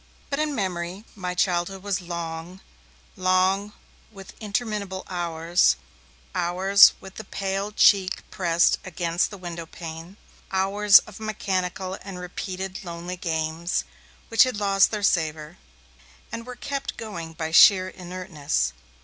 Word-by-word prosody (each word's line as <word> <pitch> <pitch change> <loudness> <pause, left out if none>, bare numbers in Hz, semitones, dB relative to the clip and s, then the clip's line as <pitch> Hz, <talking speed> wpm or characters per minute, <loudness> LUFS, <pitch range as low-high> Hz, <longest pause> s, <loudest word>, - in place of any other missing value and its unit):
But 280 - -1
in 305 -2 0
memory, 185 -1 -3
my 180 -3 -4
childhood 180 +1 0
was 200 -2 -1
long, 170 +1 -6 0.5
long 185 +2 +2 0.4
with 195 -3 -12
interminable 205 -3 -3
hours, 170 -1 +2 0.6
hours 190 +3 +6
with 190 0 -12
the 220 - -6
pale 195 0 -3
cheek 195 -3 +4
pressed 170 -2 +2
against 170 -2 -1
the 205 - -9
windowpane, 170 0 -8 0.3
hours 195 +1 +6
of 215 -1 -12
mechanical 190 -3 -3
and 195 -2 -8
repeated 185 +1 -5
lonely 175 0 -6
'games', 165 0 -2 0.5
which 225 - +4
had 255 -4 +4
lost 195 -2 +4
their 210 -2 -4
savour, 160 -3 0 0.7
and 230 +1 -6
were 250 - -7
kept 275 +2 -4
going 170 -7 -7
by 160 -1 -4
sheer 185 +2 +7
inertness. 180 - -3
185 Hz, 125 wpm, -25 LUFS, 170-200 Hz, 0.7 s, sheer